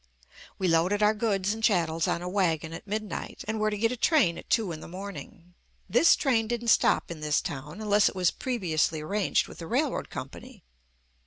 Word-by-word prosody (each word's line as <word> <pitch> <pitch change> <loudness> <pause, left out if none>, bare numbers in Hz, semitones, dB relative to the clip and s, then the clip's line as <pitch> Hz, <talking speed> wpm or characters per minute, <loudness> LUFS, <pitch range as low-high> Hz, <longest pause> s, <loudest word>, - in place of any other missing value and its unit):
We 190 - 0
loaded 180 +5 +2
our 210 +1 +5
goods 205 -2 0
and 225 0 -8
chattels 165 -6 +2
on 170 - -1
a - - -4
wagon 165 -4 0
at 165 - -9
midnight 215 +1 -5
and 220 0 -2
were 215 0 +2
to 210 - -3
get 225 +3 +1
a - - -2
train 250 - +3
at - - -14
two 220 -6 +1
in 155 - -6
the - - -10
morning. 180 -2 -9 0.3
This 245 - +5
train 230 -6 +1
didn't 235 0 -2
stop - - +3
in 165 - -7
this 150 -1 +1
town 145 +7 -6
unless 210 -1 +3
it - - -12
was 180 -2 +2
previously 165 - -1
arranged 195 +5 0
with - - -12
the 165 - -7
railroad 270 - -1
company. - - -9
200 Hz, 200 wpm, -27 LUFS, 165-220 Hz, 0.3 s, our